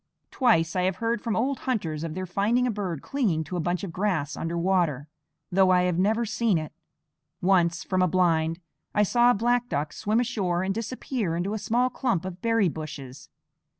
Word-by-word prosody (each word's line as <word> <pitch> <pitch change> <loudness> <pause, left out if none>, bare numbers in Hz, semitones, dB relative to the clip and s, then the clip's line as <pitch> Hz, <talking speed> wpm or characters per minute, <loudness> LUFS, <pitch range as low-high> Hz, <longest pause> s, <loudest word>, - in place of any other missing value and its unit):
Twice 180 - +2
I 180 - +2
have 185 0 0
heard 230 +4 -1
from 230 -3 -2
old 265 +4 0
hunters 165 -11 -1
of 165 -1 -4
their 185 0 -3
finding 210 +7 +1
a 250 - +1
bird 190 -8 -4
clinging 205 - 0
to 170 +4 -6
a - - -1
bunch 175 +3 -1
of 190 - -4
grass 175 -6 -1
under 165 +1 -3
water, 170 -6 +1 0.4
though 190 +1 +4
I 180 -1 +4
have 180 -1 0
never 220 +5 +2
seen 225 -3 +1
it. 155 -1 -5 0.7
Once, 175 -1 +2
from 185 -1 0
a 185 - +4
blind, 165 -2 +1 0.4
I 210 - +4
saw 240 +4 +4
a 245 - +4
black 245 +3 +1
duck 145 +1 -2
swim 215 +3 0
ashore 185 -7 0
and 195 +1 0
disappear 225 -4 -3
into 180 +4 -2
a 220 - -2
small 245 +4 +1
clump 230 -9 -1
of 185 -1 -7
berry 225 -4 +2
bushes. 140 -5 -7
185 Hz, 200 wpm, -26 LUFS, 165-225 Hz, 0.7 s, though